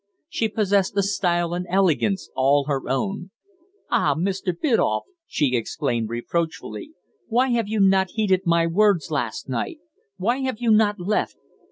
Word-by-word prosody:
She 225 -8 -1
possessed 200 -2 +1
a 200 - +3
style 175 -3 0
and 180 +1 -3
elegance 190 +1 +1
all 140 +2 +3
her 140 -2 -2
own. 195 +7 -2 0.6
"Ah! 155 - +2
Mr. 190 +2 -1
Biddulph!" 225 - +1 0.2
she 135 -4 0
exclaimed 120 -2 -2
reproachfully. 165 - -4 0.3
"Why 245 +3 +2
have 235 -3 +1
you 215 0 -1
not 190 -1 +4
heeded 195 -4 +2
my 170 0 +3
words 175 -3 +2
last 120 -8 -2
night? 130 - -3 0.4
Why 230 +7 0
have 265 -4 -2
you 235 -2 +2
not 210 -1 +3
left? 200 +4 -1
190 Hz, 150 wpm, -23 LUFS, 160-215 Hz, 0.6 s, not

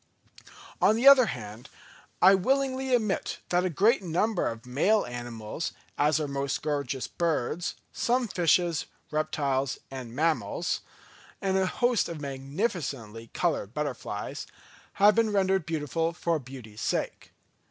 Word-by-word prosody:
On 215 - +5
the 240 +4 +3
other 265 -4 +9
hand, 110 0 -7 0.5
I 190 +2 +9
willingly 265 +5 +1
admit 215 -5 -1
that 180 0 +2
a - - +1
great 210 - +3
number 185 +3 0
of 115 0 -5
male 185 +13 +2
animals, 120 +2 -5 0.2
as 150 +1 +2
all - - -1
our - - -5
most 140 0 -2
gorgeous 140 -4 -2
birds, 170 -1 -1 0.2
some 245 0 +1
fishes, 175 -3 +2 0.2
reptiles, 140 -3 0
and 125 -3 -7
mammals, 165 +3 0 0.6
and 190 -1 0
a 190 -1 +2
host 245 +3 +1
of 165 -2 -5
magnificently 135 - -3
coloured 105 +4 -1
butterflies, 135 -8 -4 0.5
have 205 +2 +6
been 225 -1 +2
rendered 190 -3 +1
beautiful 165 +1 -1
for 165 -1 0
beauty's 125 -5 -10
sake. - - -2
160 Hz, 130 wpm, -28 LUFS, 135-195 Hz, 0.6 s, other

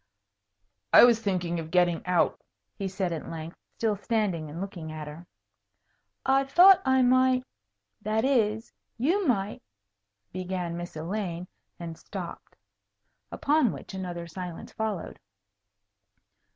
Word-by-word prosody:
"I - - +9
was 240 -2 +6
thinking 180 -4 -1
of 160 -1 -6
getting 175 -1 +2
out," 180 -1 +2 0.3
he 195 - -4
said 190 -2 -2
at 160 - -6
length, 165 0 -7 0.2
still 220 -2 +1
standing 200 -7 -1
and 160 +3 -7
looking 175 -5 -6
at 155 -1 -6
her. 160 +4 -10 1.0
"I 270 +1 +4
thought 355 +8 +7
I 260 -1 +3
might 255 0 +4 0.6
that 215 +3 0
is 225 -4 +1 0.2
you 340 - +1
might 205 -4 0 0.4
" 100 0 -51
began 180 -2 -3
Miss 175 -1 -7
Elaine, 175 +1 -4 0.3
and 165 -1 -6
stopped. - - -8 0.8
Upon 290 -6 +2
which - - -9
another 175 -2 -5
silence 175 0 -7
followed. 215 -5 -4
190 Hz, 125 wpm, -27 LUFS, 170-230 Hz, 1.0 s, I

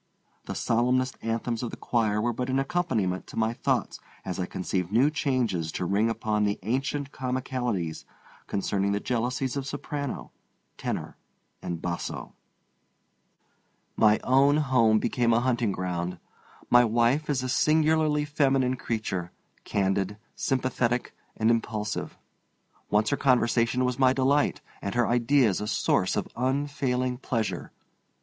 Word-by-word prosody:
The - - -5
solemnest 125 +2 +1
anthems 115 0 -2
of 120 - -3
the - - -8
choir 110 -3 0
were 120 +2 0
but 125 +3 -3
an 130 - +1
accompaniment 135 - -1
to - - -10
my 110 +1 +1
thoughts - - -1 0.3
as 95 0 -4
I 90 - -1
conceived 90 0 -2
new 130 +7 +4
changes 120 - 0
to 90 - -2
ring 100 +5 +2
upon 110 -2 0
the 100 0 +1
ancient 135 +5 -1
comicalities 125 - -2 0.4
concerning 100 0 0
the 100 - 0
jealousies 125 +3 -1
of 140 -1 -3
soprano, 145 -1 -4 0.4
tenor, - - -4 0.4
and 85 -2 -5
basso. 85 -1 -4 1.6
My 110 0 +4
own 140 +3 +4
home 125 -7 +4
became 120 +1 +1
a 115 - +4
hunting 120 -3 +1
ground. 90 -1 -3 0.5
My 120 0 +6
wife 120 +6 +2
is 130 -3 0
a - - -2
singularly 155 +1 +3
feminine 135 -3 +2
creature, 100 -7 -3 0.3
candid, 95 0 0 0.2
sympathetic, 125 -2 -1 0.2
and 110 +1 +3
impulsive. 105 -2 -2 0.7
Once 105 +1 +2
her 140 - +1
conversation 125 -1 +2
was 125 +1 -1
my 130 -1 +5
delight, 140 +2 +2 0.2
and 100 +3 -4
her 120 -1 +3
ideas 120 -3 +3
a 105 - -3
source 105 - +1
of - - -1
unfailing 130 -1 -1
pleasure. 115 -4 -2
120 Hz, 135 wpm, -27 LUFS, 105-130 Hz, 1.6 s, My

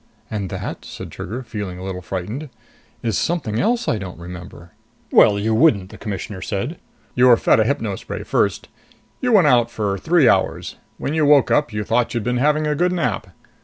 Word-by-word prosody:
"And 100 -4 -3
that," - - -5
said - - -9
Trigger, 120 +7 -6
feeling 105 -6 -6
a 90 - -8
little 95 -1 -5
frightened, 105 - -5 0.5
"is 115 -5 0
something 135 -11 -1
else 235 +1 +1
I 110 - +1
don't 95 -4 -7
remember!" 85 0 -10 0.4
"Well, 100 - +6
you 110 +2 0
wouldn't," 110 - +3
the - - -11
Commissioner 100 -2 -5
said. 120 - -3 0.3
"You 125 +1 +4
were 120 -2 +7
fed - - +3
a 110 - +3
hypno 115 -6 -1
spray - - -6
first. - - 0 0.5
You 250 - 0
went 195 -6 +6
out 120 -5 +4
for 100 -3 -2
three 160 - +3
hours. - - +1 0.2
When 140 - -3
you 160 -1 +2
woke 145 -2 +5
up, 150 -4 +2
you 105 0 -3
thought 120 +3 0
you'd 115 - -1
been 125 +2 0
having 150 +4 +2
a 150 - +1
good 180 +4 +1
nap. 125 - -1
115 Hz, 200 wpm, -21 LUFS, 100-150 Hz, 0.5 s, were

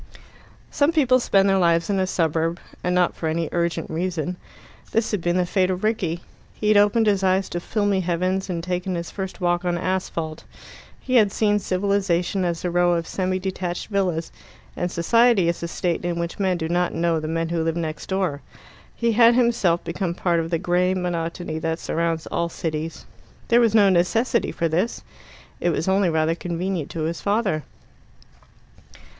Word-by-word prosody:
Some 290 +2 +2
people 260 -6 +3
spend 195 -5 +3
their 195 -1 +3
lives 170 -1 +3
in 200 -2 0
a 185 - +1
suburb, 165 -1 0 0.2
and 180 0 0
not 180 -1 +2
for 160 - -2
any 165 0 -1
urgent 170 -1 -1
reason. 175 0 -2 0.6
This 225 0 +1
had 205 -4 -1
been 175 +1 +1
the 180 - +2
fate 185 +1 +1
of 185 +1 -2
Rickie. 195 -7 0 0.3
He 210 - -1
had 215 - +5
opened 205 +2 +4
his 200 -2 +2
eyes 190 0 +2
to 175 - -3
filmy 205 +1 0
heavens, 185 +2 -1
and 170 -2 -3
taken 180 +1 -2
his 170 -1 -5
first 190 -1 -6
walk 175 -1 +1
on 175 -1 0
asphalt. 170 -3 -3 0.6
He 255 -1 +1
had 210 -4 +4
seen 210 0 +2
civilization 190 -1 0
as 170 -1 -2
a 175 - 0
row 175 0 +3
of 170 -1 -1
semi 185 +1 -1
detached 185 -2 -4
villas, 180 -5 -1 0.4
and 175 0 -2
society 230 +2 +3
as 170 - -2
a 170 - -3
state 170 0 -2
in 175 -1 -2
which 170 +2 -4
men 190 -2 +1
do 160 -2 -3
not 175 +1 0
know 165 -1 +1
the 155 - -5
men 165 +1 -1
who 170 -1 -1
live 165 0 -1
next 160 -2 -4
door. 185 -7 -1 0.5
He 235 -1 +1
had 230 +1 +6
himself 230 -9 +2
become 170 0 -3
part 175 -2 +1
of 165 0 -2
the 165 - +1
grey 180 +2 +1
monotony 170 -2 -3
that 160 0 -1
surrounds 165 -1 -2
all 170 0 -2
cities. 160 -1 -4 0.4
There 235 +1 +5
was 225 -2 +3
no 205 -3 +6
necessity 225 +7 +1
for 165 - -1
this 180 +8 -1 0.6
it 175 - +1
was 165 0 -1
only 190 -1 +3
rather 160 0 +1
convenient 175 -1 -3
to 160 - -4
his 165 +2 -3
father. 200 -6 0
180 Hz, 185 wpm, -23 LUFS, 170-195 Hz, 0.6 s, had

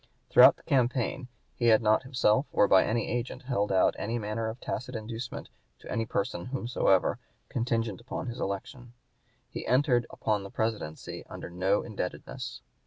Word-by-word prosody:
Throughout - - +9
the - - -23
campaign 125 0 0 0.3
he 120 - 0
had 110 -2 +7
not 110 0 +4
himself, 130 -1 +2
or 105 - +4
by 95 - +6
any 115 0 0
agent, 120 +2 -3
held 105 -6 0
out 95 - +4
any 115 +3 -2
manner 110 0 -2
of 115 +3 -7
tacit 125 0 -4
inducement 115 +2 -6 0.3
to - - -11
any 115 0 -1
person 90 -4 -2
whomsoever, 120 -7 +1 0.3
contingent 115 -3 -1
upon 120 - -5
his 120 -1 -5
election. 120 +5 -5 0.5
He - - -6
entered 125 -2 +3
upon 105 -2 -1
the 100 - -8
Presidency 110 -8 -3
under - - -8
no 95 +3 +1
indebtedness. 100 -5 -5
115 Hz, 160 wpm, -29 LUFS, 105-125 Hz, 0.5 s, Throughout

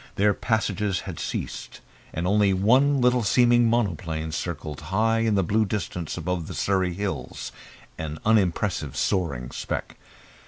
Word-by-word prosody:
Their 105 +1 +3
passages 105 -3 0
had - - -7
ceased, - - -5 0.3
and 85 - -3
only 100 +1 +3
one 130 +9 +4
little 125 0 +4
seeming 120 +2 +4
monoplane 85 -8 -1
circled 80 -3 -4
high 110 +4 +2
in 115 -2 +2
the 95 - +3
blue 105 +6 +2
distance 90 -5 -3
above 85 0 -2
the - - -6
Surrey 95 -3 +1
Hills, 95 -10 -4 0.5
an 80 -1 -4
unimpressive 95 - +1
soaring 80 -11 -1
speck. - - -4
100 Hz, 135 wpm, -25 LUFS, 85-110 Hz, 0.5 s, one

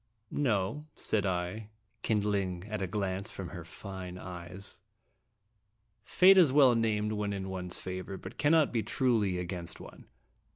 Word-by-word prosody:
"No," 120 +2 0
said 105 -2 0
I, 90 +4 -2 0.3
kindling 100 -5 0
at 105 -1 -3
a 95 - -1
glance 100 +1 -2
from 95 -6 -6
her 85 +1 -7
fine 90 +1 -8
eyes; 90 +2 -8 1.2
"Fate 190 +1 +6
is 170 -8 +7
well 135 -3 +6
named 110 -2 +1
when 105 -1 -1
in 95 -1 -4
one's 90 -2 -4
favor, 95 +1 -5
but 95 +4 -10
cannot 150 0 +4
be 115 - +2
truly 110 -7 +1
against 85 -2 -5
one. - - -12
100 Hz, 140 wpm, -31 LUFS, 90-110 Hz, 1.2 s, is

